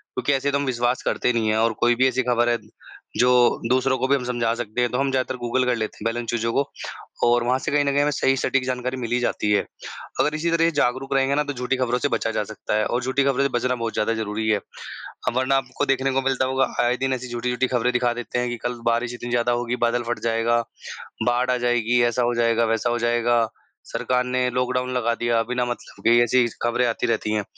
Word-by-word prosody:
क्योंकि 145 - +1
ऐसे 140 +1 0
तो 140 - +1
हम 140 - -2
विश्वास 125 -1 0
करते 125 - +1
नहीं 115 -2 0
हैं 110 - +2
और 115 +1 +2
कोई 120 0 +3
भी 130 +2 +3
ऐसी 130 0 0
खबर 120 -1 +2
है 120 - +2 0.6
जो 125 - +4 0.4
दूसरों 130 +1 +2
को 130 - 0
भी 140 - +4
हम 135 - -2
समझा 120 -2 0
सकते 120 0 -3
हैं 120 - +2
तो 125 - -1
हम 135 0 +1
ज़्यादातर 130 0 -1
गूगल 130 +2 +1
कर 125 -1 +1
लेते 110 -2 -4
हैं 105 - -9
पहले 115 +1 0
उन 120 - -5
चीज़ों 115 0 -1
को। 140 - +2 0.6
और 120 0 +3
वहाँ 125 +2 +1
से - - -3
कहीं 145 0 +3
न 140 - +2
कहीं 140 +1 +2
हमें 145 +1 +2
सही 135 -2 +2
सटीक 135 0 +1
जानकारी 125 0 -2
मिल 120 -2 -5
ही 120 - +2
जाती 105 -3 -1
है। 105 - +2 0.5
अगर 150 +1 +2
इसी 165 +2 -1
तरह 165 0 +2
ये 165 - +3
जागरूक 130 +3 -1
रहेंगे 135 +1 +2
न 150 - +2
तो 145 - -2
झूठी 125 +1 -2
खबरों 125 -1 0
से 145 - +1
बचा 115 - -1
जा 105 - -1
सकता 105 - -3
है 110 - +1
और 120 - -1
झूठी 130 +2 +1
खबरों 140 0 +2
से 140 - +1
बचना 125 +1 0
बहुत 115 -2 -3
ज़्यादा 110 +2 0
ज़रूरी 110 0 -3
है। 105 -1 +3 0.8
वरना 130 +1 +2
आपको 130 +2 -2
देखने 135 -1 +1
को 135 +1 +1
मिलता 130 -1 +1
होगा 130 0 +1 0.2
आए 120 +1 +1
दिन 135 +1 0
ऐसी 125 -1 -5
झूठी-झूठी 125 +1 -1
खबरें 125 +1 +2
दिखा 125 -1 +1
देते 120 0 -4
हैं 125 0 -1
कि 120 - -4
कल 120 -1 -5
बारिश 120 +1 +1
इतनी 120 0 -6
ज़्यादा 120 0 +1
होगी, 120 0 -1
बादल 120 0 0
फ़ट 120 - -1
जाएगा, 115 +1 +1 0.7
बाढ़ 125 +1 +2
आ 125 - +1
जाएगी, 120 -1 +2
ऐसा 120 +1 +1
हो 120 0 +1
जाएगा, 115 0 +2
वैसा 115 +1 0
हो 120 0 0
जाएगा। 120 0 +2 0.4
सरकार 125 0 0
ने 125 0 0
लॉकडाउन 125 0 0
लगा 120 -2 +1
दिया, 120 -1 +1
बिना 125 +1 -1
मतलब 120 0 -7
के 115 +1 +6
ऐसी 120 +1 +3
स 115 - -12
खबरें 120 +1 +1
आती 115 - -1
रहती 110 -2 -1
हैं। 105 -1 0
125 Hz, 255 wpm, -23 LUFS, 120-130 Hz, 0.8 s, के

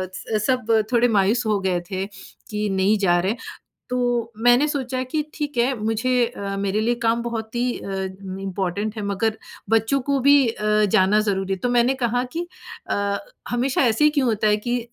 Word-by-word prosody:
स 215 +1 -2
सब 255 -3 +1 0.3
थोड़े 240 0 +4
मायूस 215 +5 +2
हो 210 -2 +1
गए 185 -2 0
थे, 190 0 -2 0.4
कि, 210 -1 -2
"नहीं, 195 +2 +2
जा 175 -3 +3
रहे 190 +3 0
हैं।" 230 - -4 0.5
तो 245 -2 0
मैंने 245 +5 +5
सोचा 260 -4 -2
कि 310 - +1
"ठीक 295 -4 -4
है। 245 +3 +3
मुझे 230 +3 +1
अ, 200 -4 -5
मेरे 200 +1 0
लिए 235 +2 +1
काम 230 +1 +2
बहुत 225 -1 -5
ही 240 - +1 0.2
अम, 190 0 -5
इम्पॉर्टेंट 195 +2 -3
है, - - -3
मगर 215 +2 -1 0.3
बच्चों 225 +5 +2
को 275 - +2
भी 285 0 +8
अ, 210 -1 +1
जाना 210 0 +4
ज़रूरी 195 -1 -1
है।" 190 - -5
तो 245 - +1
मैंने 240 +2 +4
कहा 245 +1 +1
कि 345 +1 -2 0.4
अ, 200 0 0 0.3
हमेशा 250 +2 0
ऐसे 240 +1 +2
ही - - +7
क्यों 260 - +1
होता 215 -2 +1
है 210 0 +3
कि 245 +1 +1
220 Hz, 195 wpm, -22 LUFS, 200-245 Hz, 0.5 s, भी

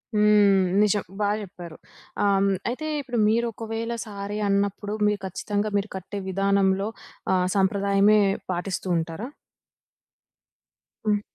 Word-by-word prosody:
హ్మ్. 205 -2 +5 0.2
నిజం 205 -1 +2
బా 205 -1 +2
జెప్పారు. 175 -5 -9 0.5
ఆహ్, 200 - +4
హ్మ్. 200 0 +3 0.2
అయితే 255 +6 -4 0.2
ఇప్పుడు 245 -3 -4
మీరొకవేళ 230 0 -1
శారీ 205 0 -5
అన్నప్పుడు 200 +1 0
మీరు 210 -1 +1
ఖచ్చితంగా 205 +3 -2
మీరు 200 +1 -2
కట్టే 195 +2 -6
విధానంలో 195 +1 +2 0.5
ఆహ్, 180 -1 +2
సంప్రదాయమే 200 +2 +3 0.3
పాటిస్తూంటారా? 180 +1 -2 1.8
హ్మ్. 210 -1 +2
200 Hz, 105 wpm, -25 LUFS, 190-210 Hz, 1.8 s, హ్మ్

